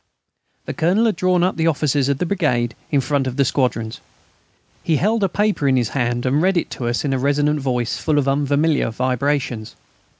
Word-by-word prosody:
The -, -, -4 dB
Colonel 190 Hz, +8 st, +2 dB
had 220 Hz, -, +1 dB
drawn 180 Hz, +1 st, +1 dB
up 185 Hz, -1 st, 0 dB
the 165 Hz, 0 st, +1 dB
officers 145 Hz, -3 st, +1 dB
of 140 Hz, -, +1 dB
the 180 Hz, -, -1 dB
brigade 145 Hz, -, 0 dB, 0.2 s
in 140 Hz, -2 st, +2 dB
front 135 Hz, +1 st, -1 dB
of 130 Hz, -, -5 dB
the 140 Hz, -, +3 dB
squadrons. 115 Hz, -4 st, -1 dB, 0.8 s
He 160 Hz, -, +1 dB
held 210 Hz, +8 st, +1 dB
a 195 Hz, -, +2 dB
paper 205 Hz, -7 st, 0 dB
in 130 Hz, -1 st, +3 dB
his 120 Hz, -3 st, 0 dB
hand 120 Hz, -2 st, -1 dB
and 135 Hz, +4 st, +2 dB
read 185 Hz, +1 st, +2 dB
it 170 Hz, -, -2 dB
to 120 Hz, -, -4 dB
us 120 Hz, +4 st, -1 dB
in 135 Hz, -, 0 dB
a 130 Hz, -, 0 dB
resonant 145 Hz, +2 st, +1 dB
voice, 125 Hz, -4 st, -1 dB
full 155 Hz, -2 st, 0 dB
of 140 Hz, -2 st, +1 dB
unfamiliar 145 Hz, +2 st, +1 dB
vibrations. 130 Hz, -1 st, -2 dB
140 Hz, 205 wpm, -20 LUFS, 125-165 Hz, 0.8 s, the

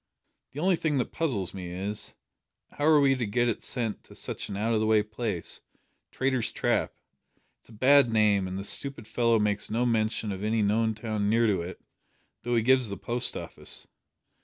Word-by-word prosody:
"The 140 Hz, -, -6 dB
only 180 Hz, +2 st, +3 dB
thing 155 Hz, -3 st, 0 dB
that 125 Hz, -, -1 dB
puzzles 120 Hz, -, -1 dB
me 90 Hz, -2 st, -6 dB
is, 100 Hz, +4 st, -4 dB, 0.6 s
how 145 Hz, -, -3 dB
are 155 Hz, -2 st, +6 dB
we 140 Hz, -1 st, +4 dB
to 125 Hz, -3 st, -1 dB
get 120 Hz, +4 st, +1 dB
it 115 Hz, -, -1 dB
sent 115 Hz, -5 st, -3 dB
to -, -, -15 dB
such -, -, -5 dB
an 100 Hz, -, -4 dB
out 110 Hz, +3 st, 0 dB
o' 110 Hz, -, +2 dB
the 110 Hz, -, +1 dB
way 110 Hz, -1 st, +4 dB
place 105 Hz, -4 st, -3 dB, 0.5 s
Traitor's 130 Hz, -3 st, 0 dB
Trap! -, -, 0 dB, 0.7 s
It's -, -, -20 dB
a -, -, -14 dB
bad 135 Hz, +3 st, +5 dB
name, 105 Hz, -4 st, +3 dB
and 95 Hz, +1 st, -5 dB
the 100 Hz, -, -4 dB
stupid 115 Hz, +2 st, 0 dB
fellow 115 Hz, 0 st, +2 dB
makes 105 Hz, -1 st, 0 dB
no 115 Hz, +3 st, 0 dB
mention 110 Hz, -2 st, 0 dB
of 95 Hz, +1 st, -5 dB
any 110 Hz, 0 st, +1 dB
known 110 Hz, +2 st, +1 dB
town 110 Hz, -2 st, -2 dB
near 115 Hz, +2 st, +3 dB
to 100 Hz, -5 st, +2 dB
it, 90 Hz, +2 st, -7 dB, 0.6 s
though 120 Hz, 0 st, -1 dB
he 115 Hz, -, +2 dB
gives 130 Hz, -1 st, +3 dB
the 100 Hz, -, -5 dB
post 120 Hz, +1 st, -1 dB
office. -, -, -6 dB
110 Hz, 200 wpm, -28 LUFS, 105-125 Hz, 0.7 s, are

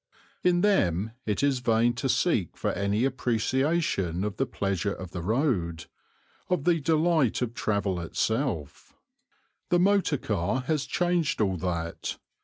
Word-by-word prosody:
In 175 Hz, -1 st, +3 dB
them 110 Hz, -, +2 dB, 0.2 s
it 105 Hz, +5 st, 0 dB
is 140 Hz, -3 st, +2 dB
vain 120 Hz, 0 st, +2 dB
to 135 Hz, +1 st, -1 dB
seek 115 Hz, -, +1 dB
for -, -, -1 dB
any 100 Hz, +4 st, 0 dB
appreciation 130 Hz, -, 0 dB
of 105 Hz, 0 st, -3 dB
the 135 Hz, -, 0 dB
pleasure 100 Hz, 0 st, -1 dB
of 95 Hz, -2 st, -8 dB
the 90 Hz, -, -5 dB
road, 90 Hz, -, 0 dB, 0.6 s
of 180 Hz, -6 st, +1 dB
the 170 Hz, 0 st, +3 dB
delight 155 Hz, -5 st, +2 dB
of 115 Hz, -2 st, -3 dB
travel 100 Hz, -5 st, -1 dB
itself. 85 Hz, -, -2 dB, 0.8 s
The 175 Hz, -, +4 dB
motor 190 Hz, -4 st, +3 dB
car 105 Hz, +3 st, -1 dB
has 150 Hz, +2 st, -1 dB
changed 175 Hz, -3 st, 0 dB
all 95 Hz, -4 st, +1 dB
that. 85 Hz, -1 st, -3 dB
115 Hz, 140 wpm, -27 LUFS, 95-155 Hz, 0.8 s, The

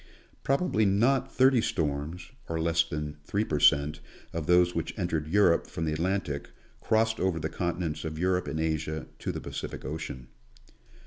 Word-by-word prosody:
Probably 135 Hz, -5 st, +2 dB
not 115 Hz, +7 st, +2 dB
thirty 130 Hz, -2 st, +4 dB
storms, 80 Hz, 0 st, -2 dB, 0.2 s
or 80 Hz, 0 st, -1 dB
less 80 Hz, 0 st, +3 dB
than 75 Hz, -2 st, -5 dB
three 100 Hz, +7 st, -1 dB
per 75 Hz, -6 st, -1 dB
cent, 70 Hz, +2 st, +4 dB, 0.3 s
of 80 Hz, -2 st, -3 dB
those 90 Hz, 0 st, +5 dB
which 85 Hz, -1 st, -3 dB
entered 80 Hz, -5 st, -1 dB
Europe 90 Hz, -1 st, +3 dB
from 80 Hz, -, -4 dB
the 80 Hz, -, 0 dB
Atlantic, 85 Hz, -3 st, -2 dB, 0.3 s
crossed 110 Hz, 0 st, +1 dB
over 90 Hz, -3 st, +1 dB
the 80 Hz, 0 st, -2 dB
continents 85 Hz, -1 st, -2 dB
of 80 Hz, -1 st, -4 dB
Europe 90 Hz, +1 st, +1 dB
and 80 Hz, -, -3 dB
Asia 80 Hz, -1 st, -1 dB
to -, -, -2 dB
the -, -, -5 dB
Pacific -, -, -6 dB
ocean. 65 Hz, -4 st, -6 dB
85 Hz, 165 wpm, -28 LUFS, 75-95 Hz, 0.3 s, those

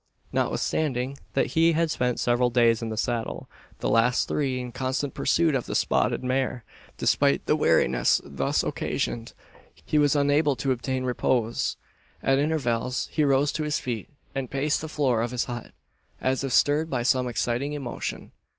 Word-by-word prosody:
Notwithstanding 135 Hz, -2 st, -1 dB
that -, -, +1 dB
he 165 Hz, +1 st, +4 dB
had 165 Hz, 0 st, +1 dB
spent 125 Hz, -4 st, 0 dB
several 120 Hz, 0 st, +2 dB
days 115 Hz, -2 st, +3 dB
in 115 Hz, -, -3 dB
the 110 Hz, -, -4 dB
saddle 115 Hz, 0 st, -2 dB, 0.3 s
the -, -, 0 dB
last 115 Hz, +2 st, +3 dB
three 135 Hz, -4 st, -1 dB
in 125 Hz, -1 st, -5 dB
constant 130 Hz, +2 st, -2 dB
pursuit 165 Hz, -2 st, +2 dB
of 130 Hz, -3 st, -1 dB
the -, -, -3 dB
spotted -, -, +1 dB
mare 130 Hz, -1 st, -1 dB, 0.3 s
despite -, -, +2 dB
the -, -, +3 dB
weariness 60 Hz, -1 st, +3 dB
thus 70 Hz, -1 st, 0 dB
occasioned, 115 Hz, -1 st, -3 dB, 0.5 s
he 150 Hz, -, +2 dB
was 145 Hz, 0 st, +3 dB
unable 145 Hz, 0 st, +3 dB
to 130 Hz, +3 st, -1 dB
obtain 130 Hz, +1 st, -2 dB
repose. 120 Hz, -2 st, 0 dB, 0.5 s
At 135 Hz, 0 st, +3 dB
intervals 130 Hz, -5 st, -1 dB
he 155 Hz, -, +1 dB
rose 140 Hz, 0 st, +3 dB
to 155 Hz, -, -3 dB
his 150 Hz, 0 st, 0 dB
feet, 115 Hz, -5 st, -4 dB, 0.2 s
and 135 Hz, -3 st, -3 dB
paced 140 Hz, +2 st, 0 dB
the 160 Hz, -, -6 dB
floor 130 Hz, -7 st, +1 dB
of 120 Hz, -, -1 dB
his 125 Hz, 0 st, -1 dB
hut, 120 Hz, -2 st, -6 dB, 0.5 s
as 130 Hz, +1 st, 0 dB
if 135 Hz, -, -2 dB
stirred 150 Hz, +5 st, +3 dB
by 130 Hz, -4 st, -1 dB
some 130 Hz, 0 st, +2 dB
exciting 125 Hz, +4 st, -1 dB
emotion. 135 Hz, -5 st, -5 dB
130 Hz, 170 wpm, -26 LUFS, 120-145 Hz, 0.5 s, he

